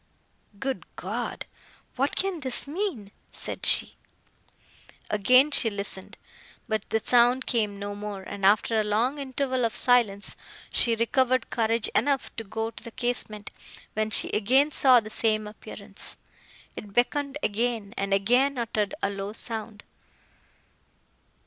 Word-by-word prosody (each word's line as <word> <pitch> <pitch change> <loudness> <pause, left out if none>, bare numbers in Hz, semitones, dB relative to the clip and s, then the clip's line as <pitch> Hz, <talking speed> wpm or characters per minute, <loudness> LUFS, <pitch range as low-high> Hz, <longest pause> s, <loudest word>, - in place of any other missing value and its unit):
"Good 265 +4 -4
God!—what 275 +3 -5
can 385 -3 +1
this 260 -1 +1
mean!" 295 - -3 0.2
said - - +1
she. - - +7 1.1
Again 255 +8 +4
she 240 -5 +6
listened, 200 -2 -6 0.5
but 220 -2 -3
the 220 - +1
sound 245 +1 +3
came 210 -4 0
no 205 0 -5
more; 205 -1 -7
and, 200 +1 -8
after 215 +3 +3
a - - +1
long 230 +7 0
interval 260 -1 -2
of 230 0 -1
silence, 230 -5 +1 0.4
she 230 -1 +2
recovered 255 +2 +1
courage 225 -1 +1
enough 280 -2 0
to 225 - -3
go 225 +2 -4
to 225 - -14
the 235 - -7
casement, 235 -3 -4 0.4
when 215 0 -1
she - - +5
again 260 +8 +2
saw 260 -3 +5
the 215 -1 -9
same 215 -1 +1
appearance! 210 +1 -7 0.6
It 205 -1 -10
beckoned 280 +5 0
again, 220 -1 -2
and 195 0 -3
again 245 +8 +2
uttered 220 -3 -2
a 200 - +1
low 200 +1 -5
sound. 220 -2 -5
230 Hz, 135 wpm, -26 LUFS, 210-255 Hz, 1.1 s, she